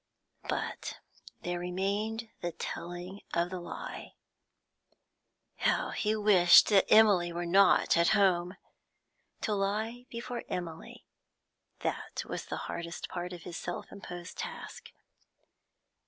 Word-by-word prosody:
But - - -3 0.4
there 175 0 -2
remained 200 +5 -2
the 175 -1 -3
telling 175 +3 -6
of 170 +1 +1
the 185 - -4
lie. 175 - -7 1.4
How - - +1
he 215 0 0
wished 195 -5 +7
that 200 -3 +4
Emily 200 -6 +6
were 175 +1 -3
not 195 +3 +5
at 170 0 +4
home! 180 -2 +2 0.8
To 215 - 0
lie 215 +5 -2
before 240 +1 -5
Emily, 165 -3 -6 0.8
that - - -3
was - - -5
the - - -4
hardest 170 0 -5
part 175 0 -4
of 175 -2 -8
his 175 -2 -6
self 175 - -5
imposed 175 -3 -8
task. - - -7
180 Hz, 115 wpm, -31 LUFS, 175-210 Hz, 1.4 s, wished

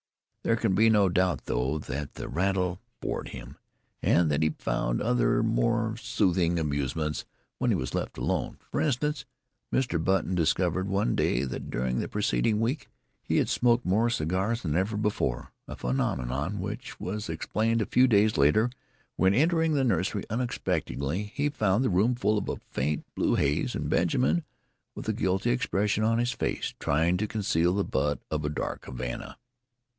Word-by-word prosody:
There 115 - +2
can 115 -4 +1
be 110 +4 +5
no 105 -3 +5
doubt, 90 0 +1
though, 65 +5 0
that 75 -1 -5
the - - -6
rattle 90 0 0 0.2
bored - - -3
him, - - -9 0.4
and 85 -3 +3
that 75 +1 +1
he 80 - +3
found - - -1
other - - +2
and - - +1
more - - +1
soothing 85 -2 +1
amusements 75 0 -1 0.4
when - - +1
he - - +3
was 65 - -3
left - - -3
alone. - - -1
For - - 0
instance, 150 -1 0 0.5
Mr. 100 -11 0
Button 95 0 +1
discovered 90 +2 +1
one 100 -11 +1
day 60 - +1
that 65 - -5
during 65 0 -1
the - - -2
preceding 105 - +1
week 125 +6 -1 0.3
he - - 0
had - - +2
smoked 120 0 +2
more 110 +6 +3
cigars 95 +4 -1
than 80 -4 -1
ever 100 +4 0
before 105 - -1 0.2
a - - -6
phenomenon, 65 +7 -1
which 105 +8 -6
was 105 +3 -4
explained 115 +1 0
a 110 - +1
few 130 +1 +4
days 105 -2 +4
later 75 - +4 0.5
when, 95 +2 +4
entering 160 +3 +3
the 135 - +2
nursery 100 -4 0
unexpectedly, 95 - -2
he 145 +1 +1
found 110 -5 +1
the 125 - +1
room 105 +8 +3
full 105 -3 +1
of - - -5
faint 75 +3 -2
blue - - +1
haze 70 +1 +1
and - - -2
Benjamin, 75 +7 +2 0.5
with - - -7
a - - +1
guilty 95 +5 0
expression 105 -4 +1
on 115 +1 +3
his 120 +1 +1
face, 125 - -2
trying 80 +5 +2
to 105 +3 -1
conceal 95 -5 +1
the 100 - +1
butt 75 -2 0
of 75 -1 -1
a 75 - 0
dark 75 - -4
Havana. 65 -1 -6
95 Hz, 170 wpm, -28 LUFS, 75-110 Hz, 0.5 s, be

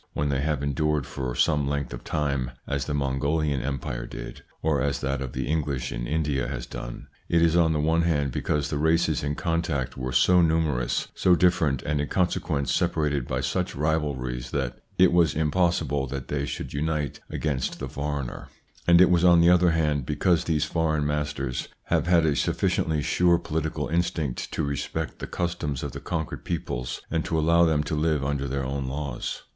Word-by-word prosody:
When 75 0 -1
they 70 -1 0
have 75 -1 -1
endured 75 0 0
for 65 -2 -4
some 75 +1 +2
length 70 -3 -2
of - - -8
time, 70 -4 -1 0.2
as 70 0 -2
the 75 - -3
Mongolian 70 +1 0
Empire 60 -3 -3
did, - - -8 0.2
or 75 -4 +2
as 70 0 0
that 70 -1 -1
of 65 -3 -5
the - - -2
English 70 -5 -1
in - - -4
India 75 -4 0
has - - -4
done, - - -7 0.2
it 85 - +4
is 85 0 +3
on 85 -2 +4
the 75 - 0
one 80 +2 +2
hand 75 -5 +1
because 75 +3 -1
the 75 - -1
races 80 0 +2
in 75 0 -2
contact 85 -6 -1
were 65 0 -3
so 90 +9 +5
numerous, 80 -7 +1
so 90 - +4
different, 80 -7 +2
and 75 -1 0
in 75 - -2
consequence 80 -6 0
separated 75 -7 0
by 65 0 -1
such 80 +8 -1
rivalries 70 -5 -1
that 60 -4 -2 0.2
it 95 0 +6
was 85 -3 +4
impossible 80 -3 +1
that 70 0 -6
they 70 -1 -1
should - - -5
unite 75 0 -2
against 70 -5 -2
the - - -5
foreigner; 70 -3 -4 0.4
and 85 0 +7
it 90 - +7
was 85 -1 +3
on 85 -1 +7
the 85 +1 +6
other 90 0 +5
hand 75 -4 +1
because 80 +3 +2
these 80 -3 +1
foreign 80 -3 0
masters 75 -3 -2 0.2
have - - 0
had 85 -2 +4
a 75 -2 +2
sufficiently 75 +1 0
sure 90 -1 +3
political 80 -2 -2
instinct 80 -5 -1
to - - -1
respect 70 0 -3
the - - -5
customs 85 -6 -2
of - - -3
the - - -7
conquered 80 -3 -4
peoples 65 -6 -3
and 80 -1 0
to 80 - -1
allow 85 +2 +4
them 80 -2 +2
to 75 - -4
live 75 -2 +1
under 70 -1 -1
their 70 0 -2
own 70 0 -3
laws. 70 -2 -4
75 Hz, 190 wpm, -26 LUFS, 70-80 Hz, 0.4 s, and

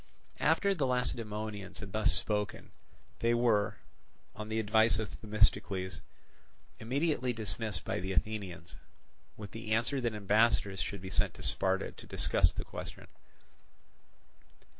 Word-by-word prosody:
After 200 0 +3
the 150 -8 0
Lacedaemonians 110 -5 -2
had 100 -2 -7
thus 110 +1 +2
spoken, 105 -1 -1 0.5
they 115 0 +3
were, 115 -4 +2 0.6
on 110 0 -6
the 110 0 0
advice 110 0 +4
of 110 -2 -3
Themistocles, 100 -3 +1 0.8
immediately 130 +1 0
dismissed 110 -3 -3
by - - -1
the 95 +2 -3
Athenians, 95 -3 -2 0.6
with 105 -2 -8
the 115 0 -6
answer 120 +5 +1
that 120 -3 0
ambassadors 105 -1 +2
should 100 -2 -4
be 95 0 -7
sent - - +1
to - - -9
Sparta 95 0 +1
to - - -12
discuss - - +3
the - - -5
question. - - -8
110 Hz, 130 wpm, -32 LUFS, 100-115 Hz, 0.8 s, advice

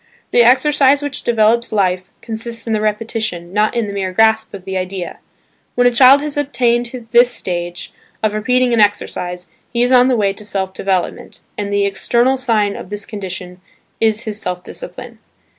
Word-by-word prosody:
The 240 - +5
exercise 275 +3 +4
which 290 -2 -4
develops 235 0 +2
life, 185 -3 0 0.2
consists 230 0 -5
in 225 - -1
the 215 - 0
repetition, 215 -5 -2
not 210 +3 +1
in 235 -2 0
the 200 - -6
mere 190 -2 -2
grasp 220 +2 +2
of 190 -2 -10
the 190 0 -5
idea. 185 -1 -4 0.6
When 245 - +3
a 245 - +5
child 260 +3 +7
has 300 -1 -4
attained 240 -3 0
this 240 +1 +6
stage, 175 -6 -4 0.3
of 215 -1 +1
repeating 250 +3 +1
an 230 - +3
exercise, 180 -3 -1 0.3
he 235 0 +1
is 245 - +1
on 250 0 +6
the 255 -2 +2
way 200 -2 +1
to 205 - -7
self 195 -2 -3
development, 190 -2 -3
and 205 -1 -4
the 200 0 +2
external 240 +6 +1
sign 225 -6 0
of - - -9
this 205 0 -6
condition 185 -3 -7 0.4
is 220 -1 +2
his 215 0 -4
self 180 -2 -4
discipline. - - -9
220 Hz, 180 wpm, -17 LUFS, 195-240 Hz, 0.6 s, child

